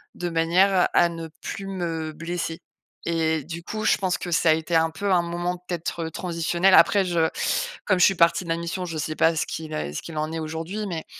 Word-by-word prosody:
de 175 - -3
manière 180 +3 +3
à 175 - +5
ne 165 -1 -7
plus 195 - -5
me 165 -4 -3
blesser, 165 +1 -4 0.5
et 160 -2 0
du 170 +1 -7
coup, 215 +4 -5
je - - +4
pense 185 -2 0
que 175 - -5
ça 165 -1 +3
a - - +7
été 160 +2 -1
un 165 0 +4
peu 200 +4 -2
un 175 - +4
moment 175 +1 -2
peut-être, 175 -1 -4
heu, - - -7
transitionnel. 175 +2 +1
Après, 200 0 +6
je 170 -3 +1 0.6
comme 185 -3 +2
je - - +7
suis 195 - +3
partie 170 +2 +3
de 170 - -9
la 165 - +1
mission, 170 +2 -4
je 165 -2 -5
sais 155 +1 -3
pas 165 +1 +4
ce - - +1
qu'il 160 -1 -6
est 75 - -3
ce - - -4
qu'il 165 -2 -8
en 155 0 -1
est 165 - -3
aujourd'hui, 165 +7 -4
mais 165 -3 -4
170 Hz, 235 wpm, -24 LUFS, 160-180 Hz, 0.6 s, a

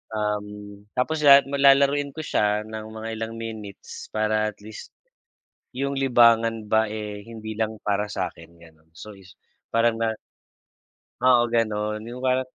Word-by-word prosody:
Um, 105 -1 -4
tapos 155 +5 0
lahat 140 0 +9
ma 140 - -2
lalaruin 140 +1 +4
ko 155 - -4
siya 105 -6 +1
ng 110 0 -7
mga 110 0 -6
ilang 110 0 -4
minutes 110 -3 -8
para 110 0 +1
at - - -36
least. 110 0 -11 0.8
Yung 140 +1 -2
libangan 115 -3 +4
ba 110 0 +3
eh, 105 -1 -6
hindi 110 -2 -8
lang 110 0 -1
para 105 0 0
sa'kin, 85 -4 -6
ganun. 80 -1 -19
So 105 +5 -10
is, 95 -1 -17 0.4
parang 115 0 +2
na 115 -1 0 1.1
Oo, 120 -2 +5
ganun. 110 -2 -1
Yung 120 +2 -8
parang 130 0 +1
110 Hz, 150 wpm, -24 LUFS, 105-120 Hz, 1.1 s, lahat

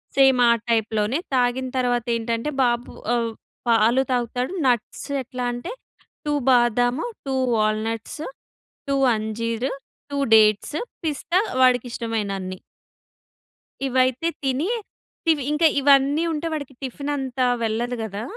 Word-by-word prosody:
Same 270 -2 +5
ఆ - - +7 0.2
టైప్‌లోనే 220 +3 +1
తాగిన 255 0 +1
తర్వాత 245 -2 +1
ఏంటంటే 230 +3 -2
బాబు 240 -1 0 0.2
ఆహ్, 230 -1 0 0.4
పాలు 230 +2 +4
తాగుతాడు 250 +4 -1
నట్స్ 240 -3 -1 0.2
ఎట్లా 250 0 -6
అంటే 245 - -6 0.5
2 295 - 0 0.2
బాదాము, 245 +2 +3 0.2
2 270 -1 -1 0.2
వాల్నట్స్, 215 +5 -1 0.7
2 275 - +1 0.2
అంజీర్, 230 +3 -2 0.4
2 285 - -2 0.2
డేట్స్, 215 +6 +4 0.3
పిస్తా 320 +4 0 0.2
వాడికి 255 -1 +4
ఇష్టమైన 225 -3 -2
అన్ని. 185 0 -6 1.3
ఇవైతే 260 +3 +1 0.2
తిని 270 +7 0 0.6
ఇవి 295 -4 0
ఇంక 300 +2 0 0.2
ఇవన్నీ 280 +2 +4
ఉంటే 320 +1 -2
వాడికి 285 -3 -5
టిఫిన్ 280 +2 -4
అంతా 260 -2 -1 0.2
వెళ్ళదు 235 +3 -1
కదా! 215 -1 -4
245 Hz, 120 wpm, -23 LUFS, 225-270 Hz, 1.3 s, ఆ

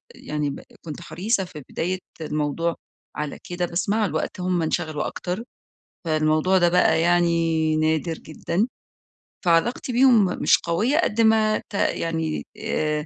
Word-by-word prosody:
يعني 150 -1 -3
ب 140 - -6 0.2
كنت 155 0 -7
حريصة 195 +5 -1
في 155 -5 -10
بداية 185 +3 -2 0.2
الموضوع 155 +2 -1 0.4
على 150 -1 -4
كده، 175 0 -1
بس 175 +2 -2
مع 215 +1 +2
الوقت 160 0 -3
هم 180 -1 0
انشغلوا 155 -2 -1
أكتر، 180 +5 -4 0.6
فالموضوع 155 +3 +2
ده 175 -1 +4
بقى 170 -2 +3
يعني 165 -2 +2
نادر 160 +1 +1
جدًا. 170 +6 -2 0.8
فعلاقتي 175 +10 +2
بيهم 245 -4 +5 0.2
مش - - +5
قوية 210 - +1
قد 230 -9 +2
ما 220 -1 +4
ت - - -18
يعني 165 -5 -1
آآ 150 -1 -1
170 Hz, 140 wpm, -23 LUFS, 155-190 Hz, 0.8 s, بيهم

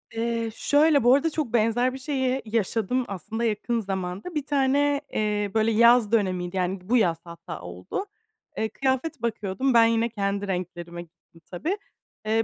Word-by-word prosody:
Eee, 230 0 -1
şöyle, 290 -2 +3
bu 245 +2 +6
arada 325 +4 +1
çok 300 -7 -3
benzer 240 +3 +2
bir 265 - -7
şeyi 260 -1 -1
yaşadım, 225 +3 0
aslında 210 +5 -5
yakın 230 +1 0
zamanda. 190 - -4
Bir 290 -2 -1
tane, 285 0 +2
eee, 210 -2 0
böyle 220 0 +2
yaz 235 0 +5
dönemiydi; 185 -4 0
yani, 185 +1 -1
bu 250 - +4
yaz 170 -7 +2
hatta 170 - -9
oldu. 90 - -5 0.5
Eee, 220 - 0
kıyafet 265 +1 -1
bakıyordum, 235 +3 -1
ben 230 -1 +7
yine, 230 +1 +2
kendi 200 -2 -2
renklerime 175 -2 -4
gittim, 165 0 -19
tabii. 335 - -2 0.5
Eee, 225 +1 +2
225 Hz, 160 wpm, -25 LUFS, 195-260 Hz, 0.5 s, ben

